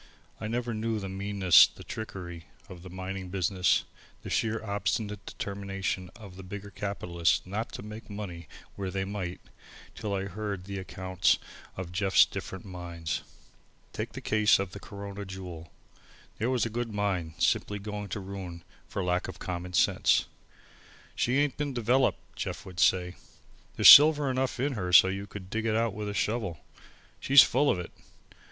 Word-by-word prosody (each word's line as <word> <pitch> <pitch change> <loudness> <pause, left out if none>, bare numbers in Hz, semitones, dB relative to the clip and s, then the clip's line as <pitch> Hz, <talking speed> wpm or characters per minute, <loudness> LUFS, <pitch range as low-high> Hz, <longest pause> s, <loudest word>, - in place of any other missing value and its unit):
I 110 - -4
never 120 +1 -2
knew 110 +1 -1
the 100 - -5
meanness, 95 -2 +5
the - - -14
trickery, 85 -6 -7 0.2
of 90 -2 -11
the 95 - -10
mining 95 +1 -6
business, 95 0 +2 0.4
the - - -7
sheer 115 0 0
obstinate 105 0 -2
determination 95 -2 -4
of 100 -5 -12
the - - -8
bigger 100 +2 -8
capitalists 90 -5 -1
not 105 +5 -4
to - - -6
make 105 +2 -9
money 90 -6 -7 0.3
when 100 -2 -4
they 95 +1 -2
might, 95 -3 -4 0.5
till 100 -2 -3
I 95 - -2
heard 100 -1 -4
the 100 0 -5
accounts 95 -1 +1 0.4
of 95 -2 -5
Jeff's 95 +2 +5
different 95 +1 -7
mines. 85 -3 -5 0.7
Take - - -4
the - - -7
case 105 0 +4
of 95 -2 -3
Corona 100 -1 -7
Jewel. 90 -5 -8 0.7
There 115 - 0
was 125 -3 +1
a 115 - -4
good 120 0 -3
mine, 95 -6 -2
simply 105 +4 +1
going 105 0 -6
to 105 - -3
ruin 95 -3 -7 0.2
for 100 - -3
lack 90 0 0
of 95 -3 -8
common 90 +1 -5
sense. - - +3 0.9
"She 125 +3 +1
ain't 145 -2 +1
been 145 -3 -2
developed," 125 +3 +1
Jeff - - -4
would 90 -2 -9
say. 90 -1 +2 0.6
"There's - - +6
silver 150 -2 +10
enough 130 0 -1
in 140 +2 0
her 90 -6 -3
so 95 +1 +8
you 100 +1 -4
could 95 -2 -10
dig 110 +1 -1
it 110 - +1
out 115 -1 +1
with 105 0 -4
a 100 - -5
shovel. 105 - -1 0.6
She's 135 0 +8
full 140 +3 +2
of - - +2
it. 90 - -6
100 Hz, 170 wpm, -29 LUFS, 90-110 Hz, 0.9 s, silver